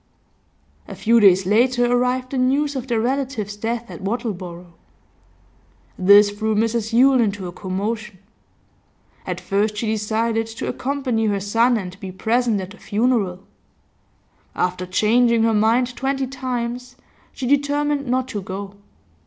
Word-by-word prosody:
A -, -, -8 dB
few 230 Hz, +1 st, +3 dB
days 190 Hz, -3 st, +5 dB
later 245 Hz, +5 st, +3 dB
arrived 250 Hz, +1 st, 0 dB
the 270 Hz, -, -1 dB
news 280 Hz, +3 st, +1 dB
of 260 Hz, -1 st, -4 dB
their 235 Hz, -3 st, 0 dB
relative's 250 Hz, -4 st, -2 dB
death 225 Hz, +2 st, -3 dB
at -, -, -9 dB
Wattleborough. 185 Hz, -6 st, -5 dB, 1.2 s
This 205 Hz, +2 st, +6 dB
threw 215 Hz, +1 st, -1 dB
Mrs 225 Hz, +1 st, 0 dB
Yule 255 Hz, +2 st, +5 dB
into 200 Hz, -3 st, -1 dB
a 175 Hz, -, -5 dB
commotion. 205 Hz, +3 st, -4 dB, 1.1 s
At -, -, -3 dB
first 210 Hz, +1 st, -1 dB
she 230 Hz, -, -2 dB
decided 220 Hz, +1 st, -1 dB
to 225 Hz, 0 st, -6 dB
accompany 255 Hz, -5 st, -1 dB
her 200 Hz, -1 st, 0 dB
son 230 Hz, +5 st, +2 dB
and 185 Hz, -2 st, -7 dB
be 190 Hz, -3 st, -7 dB
present 225 Hz, +3 st, 0 dB
at 190 Hz, 0 st, -6 dB
the 210 Hz, -, -13 dB
funeral; 210 Hz, -4 st, 0 dB, 1.1 s
after 180 Hz, 0 st, -1 dB
changing 230 Hz, +4 st, +3 dB
her 225 Hz, 0 st, +2 dB
mind 235 Hz, +4 st, +2 dB
twenty 270 Hz, 0 st, -1 dB
times, 250 Hz, -1 st, -4 dB, 0.4 s
she 260 Hz, -, -6 dB
determined 285 Hz, +1 st, +1 dB
not 255 Hz, +1 st, 0 dB
to 210 Hz, -5 st, -4 dB
go. 195 Hz, +1 st, -7 dB
225 Hz, 140 wpm, -21 LUFS, 205-250 Hz, 1.2 s, This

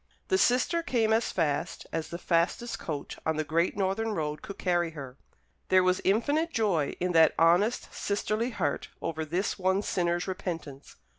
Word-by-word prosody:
The 380 Hz, -, +3 dB
sister 255 Hz, +6 st, +3 dB
came 230 Hz, -8 st, +1 dB
as 225 Hz, +1 st, +1 dB
fast 160 Hz, -1 st, -1 dB
as 160 Hz, -1 st, -2 dB
the 170 Hz, -, -5 dB
fastest 175 Hz, +7 st, 0 dB
coach 150 Hz, -3 st, -5 dB
on 160 Hz, -1 st, 0 dB
the 155 Hz, -, 0 dB
great 165 Hz, +5 st, 0 dB
northern 205 Hz, +3 st, 0 dB
road 150 Hz, -1 st, -3 dB
could 200 Hz, -, -8 dB
carry 175 Hz, -2 st, +1 dB
her. 130 Hz, -3 st, -7 dB, 0.5 s
There 185 Hz, 0 st, +5 dB
was 185 Hz, 0 st, +2 dB
infinite 285 Hz, -, +1 dB
joy 190 Hz, -, 0 dB
in 180 Hz, 0 st, 0 dB
that 160 Hz, -2 st, +5 dB
honest 175 Hz, +8 st, +3 dB
sisterly 215 Hz, +3 st, -1 dB
heart 175 Hz, -, -2 dB
over 160 Hz, -1 st, -3 dB
this 175 Hz, +7 st, -2 dB
one 190 Hz, +2 st, +1 dB
sinner's 175 Hz, -1 st, 0 dB
repentance. 165 Hz, -7 st, -6 dB
180 Hz, 165 wpm, -28 LUFS, 160-215 Hz, 0.5 s, There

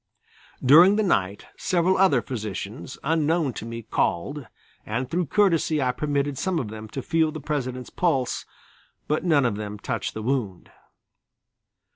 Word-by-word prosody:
During 170 Hz, +9 st, +8 dB
the 215 Hz, -, +2 dB
night 100 Hz, -, 0 dB
several 180 Hz, +1 st, +2 dB
other 170 Hz, -11 st, +4 dB
physicians 110 Hz, 0 st, -6 dB
unknown 160 Hz, -1 st, +1 dB
to 115 Hz, -, -7 dB
me 115 Hz, 0 st, -6 dB
called, 135 Hz, -, -1 dB, 0.4 s
and 115 Hz, +4 st, -3 dB
through 170 Hz, +4 st, -1 dB
courtesy 165 Hz, -4 st, +2 dB
I 130 Hz, -2 st, +2 dB
permitted 140 Hz, 0 st, -1 dB
some 185 Hz, +3 st, 0 dB
of 125 Hz, -9 st, -2 dB
them 110 Hz, 0 st, -8 dB
to 135 Hz, +3 st, -5 dB
feel 160 Hz, -1 st, +1 dB
the 155 Hz, -, -6 dB
President's 130 Hz, -4 st, -4 dB
pulse, 135 Hz, -9 st, 0 dB, 0.6 s
but 150 Hz, -, 0 dB
none 155 Hz, -7 st, +3 dB
of 110 Hz, -4 st, 0 dB
them 105 Hz, -1 st, -5 dB
touched 115 Hz, +2 st, -4 dB
the 110 Hz, -, -5 dB
wound. 115 Hz, -8 st, -2 dB
140 Hz, 150 wpm, -25 LUFS, 115-160 Hz, 0.6 s, During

